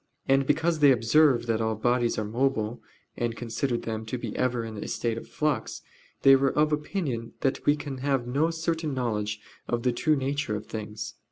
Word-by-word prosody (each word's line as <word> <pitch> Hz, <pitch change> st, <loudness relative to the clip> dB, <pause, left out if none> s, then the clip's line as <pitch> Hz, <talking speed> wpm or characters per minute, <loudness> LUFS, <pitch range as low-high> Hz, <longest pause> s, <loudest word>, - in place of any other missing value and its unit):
And 135 Hz, 0 st, +3 dB
because 160 Hz, +2 st, +2 dB
they 145 Hz, -2 st, +7 dB
observed 130 Hz, +2 st, +4 dB
that 115 Hz, -1 st, 0 dB
all 110 Hz, 0 st, 0 dB
bodies 120 Hz, +2 st, +1 dB
are 110 Hz, -, -1 dB
mobile, 115 Hz, -1 st, -1 dB, 0.3 s
and 120 Hz, -1 st, -2 dB
considered 120 Hz, +1 st, -2 dB
them 110 Hz, -1 st, -3 dB
to 125 Hz, -, -2 dB
be -, -, -5 dB
ever 125 Hz, -2 st, 0 dB
in 110 Hz, -1 st, -7 dB
a -, -, -6 dB
state 115 Hz, -2 st, -1 dB
of 115 Hz, -, -7 dB
flux, 150 Hz, -2 st, -2 dB, 0.4 s
they 135 Hz, 0 st, +9 dB
were 135 Hz, +1 st, +1 dB
of 150 Hz, 0 st, +3 dB
opinion 150 Hz, -, -2 dB
that 135 Hz, -, 0 dB
we 145 Hz, -, +6 dB
can 140 Hz, -3 st, -6 dB
have 135 Hz, -2 st, 0 dB
no 140 Hz, +7 st, +1 dB
certain 165 Hz, -2 st, -2 dB
knowledge 105 Hz, -4 st, -1 dB, 0.3 s
of 120 Hz, -1 st, -1 dB
the 125 Hz, -, +3 dB
true 155 Hz, +6 st, +2 dB
nature 135 Hz, -4 st, -1 dB
of 105 Hz, +1 st, -5 dB
things. 110 Hz, +1 st, -6 dB
125 Hz, 195 wpm, -27 LUFS, 115-145 Hz, 0.4 s, they